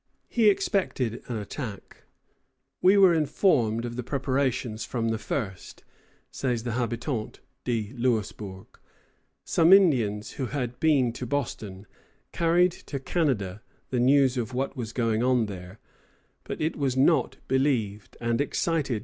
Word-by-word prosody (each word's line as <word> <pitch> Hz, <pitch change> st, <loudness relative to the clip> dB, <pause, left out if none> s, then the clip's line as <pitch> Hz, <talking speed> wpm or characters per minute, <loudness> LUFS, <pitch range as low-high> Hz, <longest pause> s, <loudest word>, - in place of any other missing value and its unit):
He 225 Hz, -3 st, +4 dB
expected 140 Hz, -, 0 dB
an 120 Hz, -, -3 dB
attack. 105 Hz, 0 st, -7 dB, 0.8 s
"We 190 Hz, +2 st, +6 dB
were 190 Hz, -3 st, +7 dB
informed 135 Hz, -, +2 dB
of 120 Hz, 0 st, -6 dB
the -, -, -1 dB
preparations 130 Hz, -4 st, -1 dB
from 115 Hz, -2 st, -2 dB
the 110 Hz, -1 st, -1 dB
first," 105 Hz, -5 st, -5 dB, 0.5 s
says 125 Hz, -4 st, -2 dB
the 120 Hz, -, -3 dB
Habitant 120 Hz, 0 st, -3 dB, 0.3 s
de 115 Hz, -2 st, -2 dB
Louisburg. 105 Hz, -5 st, -2 dB, 0.8 s
Some 165 Hz, +1 st, +3 dB
Indians, 125 Hz, -, +4 dB
who 130 Hz, -, -1 dB
had 125 Hz, -3 st, -4 dB
been 140 Hz, -7 st, +3 dB
to 125 Hz, +1 st, -6 dB
Boston, 110 Hz, -8 st, -4 dB, 0.5 s
carried 175 Hz, +2 st, +3 dB
to 145 Hz, -, -7 dB
Canada 120 Hz, -, -1 dB, 0.3 s
the 125 Hz, -, 0 dB
news 130 Hz, +1 st, +4 dB
of 120 Hz, +1 st, -3 dB
what 135 Hz, +2 st, -2 dB
was 115 Hz, -4 st, -5 dB
going 115 Hz, -2 st, 0 dB
on 125 Hz, -2 st, +3 dB
there; 95 Hz, -1 st, -8 dB, 0.7 s
but -, -, -5 dB
it 155 Hz, +1 st, -1 dB
was 135 Hz, -3 st, -1 dB
not 150 Hz, +5 st, +3 dB
believed, 115 Hz, -7 st, 0 dB
and 115 Hz, +1 st, 0 dB
excited 155 Hz, +1 st, 0 dB
no -, -, -2 dB
alarm. -, -, -2 dB
125 Hz, 140 wpm, -27 LUFS, 110-145 Hz, 0.8 s, were